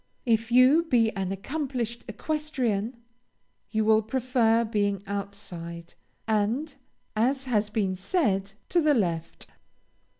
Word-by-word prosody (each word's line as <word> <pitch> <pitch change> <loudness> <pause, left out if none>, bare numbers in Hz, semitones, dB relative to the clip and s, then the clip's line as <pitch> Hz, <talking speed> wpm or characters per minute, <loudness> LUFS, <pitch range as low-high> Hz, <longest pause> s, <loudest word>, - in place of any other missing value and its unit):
If 225 -1 +1
you 255 +6 +6
be 230 -7 +3
an 190 -1 -2
accomplished 240 +1 -3
equestrian, 245 -3 -2 0.7
you 220 -1 0
will 220 0 +5
prefer 235 -1 +2
being 205 -3 0
outside, 180 -4 -6 0.3
and 225 +8 0 0.4
(as 260 +5 +1
has 215 -5 0
been 200 -3 0
said) 195 - 0 0.2
to 345 - +3
the 300 -2 +4
left. 170 -7 -2
220 Hz, 110 wpm, -27 LUFS, 200-255 Hz, 0.7 s, you